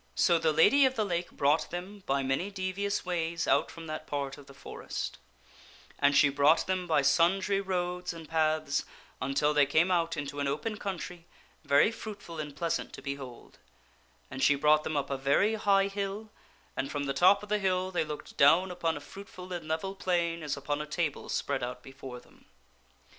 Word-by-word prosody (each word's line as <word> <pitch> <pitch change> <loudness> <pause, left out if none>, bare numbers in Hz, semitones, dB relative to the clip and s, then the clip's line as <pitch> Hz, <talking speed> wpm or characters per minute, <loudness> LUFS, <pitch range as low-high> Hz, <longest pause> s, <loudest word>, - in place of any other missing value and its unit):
So 170 -2 +4
the 160 -1 +2
Lady 210 - +5
of 260 0 +1
the 215 - 0
Lake 175 -2 -2
brought 145 +3 +1
them 185 +4 -7
by 135 0 +1
many 135 +9 -1
devious 195 +1 -2
ways 170 -2 -1
out - - +3
from 165 -1 -10
that 155 -1 -6
part 140 -1 -3
of 145 - -15
the 140 - -13
forest; - - -6 0.8
and 140 0 +4
she 145 - +7
brought 145 +3 +3
them 185 -1 -1
by 155 -4 +3
sundry 190 +7 +3
roads 180 -1 -2
and 165 -2 -9
paths 155 -2 +1 0.4
until 140 +3 +1
they 145 -2 +4
came 160 +6 +3
out 170 -2 +1
into 145 -1 -4
an 140 - 0
open 210 +11 -2
country, 180 -3 -6 0.4
very 145 +10 +4
fruitful 200 -7 -8
and 150 -2 -5
pleasant 165 +2 -2
to - - -9
be 140 -1 -2
hold; 130 -4 -11 0.7
and 135 0 -5
she 145 - +5
brought 150 +2 +4
them 155 - -2
up 140 - -2
a 135 - -1
very 140 +11 +2
high 200 -3 +3
hill, 200 +2 -4 0.4
and 135 - -2
from 145 -1 -2
the 140 -1 -1
top 185 +8 +5
of 210 - -10
the 210 0 +1
hill 185 -1 0
they 175 - +1
looked 150 -1 -8
down 170 +7 +5
upon 165 -3 -1
a - - -8
fruitful 185 +3 -10
and 170 -3 -5
level 160 +5 -2
plain 170 -3 -1
as 150 -2 -3
upon 145 +1 -2
a 150 - -6
table 150 -1 -2
spread 140 -2 -1
out 125 0 -5
before 135 -2 -9
them. - - -22
165 Hz, 195 wpm, -30 LUFS, 145-185 Hz, 0.8 s, she